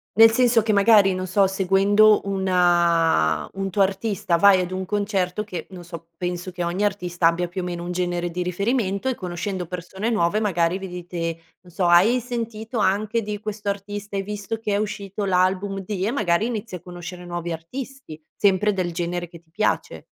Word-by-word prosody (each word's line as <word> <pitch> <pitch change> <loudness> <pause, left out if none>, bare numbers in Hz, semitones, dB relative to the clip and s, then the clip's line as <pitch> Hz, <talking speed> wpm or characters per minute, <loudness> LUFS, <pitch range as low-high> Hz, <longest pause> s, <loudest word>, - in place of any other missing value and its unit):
Nel 225 +1 +8
senso 235 -1 +3
che 215 0 +1
magari, 200 -1 +5
non 185 0 -3
so, 195 +2 +3
seguendo 195 +3 +4
una 175 - +2
un 195 0 -3
tuo 195 +1 +3
artista 195 -2 -1
vai 195 +1 +6
ad 180 0 -4
un 190 0 -3
concerto 200 -1 -1
che, 180 -6 -7
non 180 -2 -10
so, 170 -1 -10
penso 180 0 -3
che 175 -1 -4
ogni 175 +4 -1
artista 180 -4 +1
abbia 175 +1 +1
più 180 +2 -5
o - - -5
meno 175 -1 -4
un 175 - -4
genere 175 -1 -2
di 180 - -3
riferimento, 200 +4 -1
e 255 - -1
conoscendo 180 0 -4
persone 185 +5 -4
nuove 210 -1 +1
magari 180 -3 +1
vi 190 - -6
dite, 170 -2 -5 0.2
non 180 -1 -17
so: 180 +1 -1
“Hai 180 +9 +5
sentito 230 -1 -4
anche 215 +3 +1
di 210 0 -4
questo 210 -1 -4
artista, 205 0 -5
hai 195 - -1
visto 210 +2 -4
che 215 -2 -3
è 200 - +2
uscito 205 -1 -4
l'album 190 +1 +1
di”, 195 -1 -2
e 230 - 0
magari 210 -4 +1
inizi 225 -4 -5
a 175 - -8
conoscere 180 0 -9
nuovi 175 -1 -5
artisti, 200 - -7 0.2
sempre 205 +1 +2
del 185 -3 -2
genere 175 0 -3
che 170 -1 -13
ti 160 -1 -34
piace. 215 +5 -1
190 Hz, 195 wpm, -23 LUFS, 175-210 Hz, 0.2 s, Nel